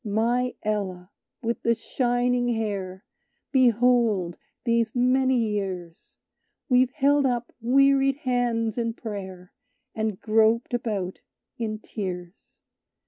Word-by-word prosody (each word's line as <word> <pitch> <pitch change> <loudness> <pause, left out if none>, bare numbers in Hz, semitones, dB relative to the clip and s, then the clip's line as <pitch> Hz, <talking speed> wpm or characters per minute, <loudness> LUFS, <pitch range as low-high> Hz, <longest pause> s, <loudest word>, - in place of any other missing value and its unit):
"My 235 +4 0
Ella 195 -3 -3 0.3
with 230 +1 -2
the 235 0 +2
shining 245 +1 0
hair, 200 -2 -4 0.5
Behold, 235 - +3 0.3
these 230 -1 +1
many 260 +1 +3
years, 195 -7 -3 0.5
We've 255 -1 +4
held 285 0 +2
up 240 -1 -2
wearied 275 +2 +4
hands 240 -3 0
in 230 -1 -1
prayer; 190 -6 -7 0.4
And 220 -3 -2
groped 225 +2 +2
about 210 -6 -2 0.4
in 215 -2 -2
tears." 185 -4 -7
230 Hz, 100 wpm, -25 LUFS, 205-245 Hz, 0.5 s, We've